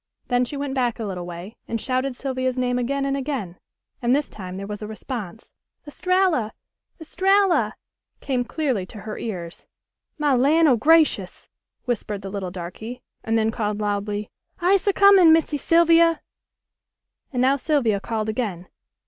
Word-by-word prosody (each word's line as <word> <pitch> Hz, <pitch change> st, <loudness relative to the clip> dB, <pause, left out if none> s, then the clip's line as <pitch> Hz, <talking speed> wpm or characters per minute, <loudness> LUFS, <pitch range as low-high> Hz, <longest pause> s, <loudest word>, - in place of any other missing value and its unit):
Then 245 Hz, 0 st, +2 dB
she 285 Hz, -, -6 dB
went 280 Hz, -1 st, -3 dB
back 245 Hz, -3 st, 0 dB
a 230 Hz, -, -4 dB
little 180 Hz, -4 st, -5 dB
way 175 Hz, +5 st, -8 dB
and 230 Hz, -, -2 dB
shouted 255 Hz, +2 st, -1 dB
Sylvia's 255 Hz, -1 st, -2 dB
name 250 Hz, 0 st, 0 dB
again 275 Hz, +3 st, -1 dB
and 275 Hz, 0 st, 0 dB
again, 260 Hz, -11 st, -4 dB, 0.4 s
and 245 Hz, +1 st, +3 dB
this 290 Hz, 0 st, -2 dB
time 185 Hz, -2 st, -7 dB
there 195 Hz, -, -5 dB
was 210 Hz, +1 st, -6 dB
a 210 Hz, -, -5 dB
response. 220 Hz, -1 st, -7 dB, 0.3 s
"Estralla! 360 Hz, -, +1 dB, 0.5 s
Estralla!" 345 Hz, -, +2 dB, 0.4 s
came 255 Hz, -3 st, -1 dB
clearly 260 Hz, -, -1 dB
to 210 Hz, -, -10 dB
her 215 Hz, -1 st, -6 dB
ears. 175 Hz, -7 st, -6 dB, 0.5 s
"My 295 Hz, -2 st, +2 dB
lan' 300 Hz, +6 st, +4 dB
o' 260 Hz, -, +5 dB
grashus!" 315 Hz, +7 st, +2 dB, 0.4 s
whispered 210 Hz, -4 st, -3 dB
the 195 Hz, -, -6 dB
little 195 Hz, -2 st, -4 dB
darky, 190 Hz, +8 st, -8 dB, 0.2 s
and 225 Hz, 0 st, +1 dB
then 220 Hz, 0 st, +1 dB
called 210 Hz, -2 st, -2 dB
loudly, 205 Hz, 0 st, -2 dB, 0.3 s
"I'se 375 Hz, +2 st, +2 dB
a 400 Hz, -, +4 dB
comin', 390 Hz, -4 st, +7 dB
Missy 320 Hz, -2 st, +3 dB
Sylvia." 335 Hz, 0 st, +4 dB, 1.1 s
And 250 Hz, -, -3 dB
now 265 Hz, +2 st, +4 dB
Sylvia 255 Hz, -7 st, +1 dB
called 220 Hz, +1 st, -3 dB
again. 210 Hz, -6 st, -3 dB
245 Hz, 155 wpm, -23 LUFS, 210-295 Hz, 1.1 s, comin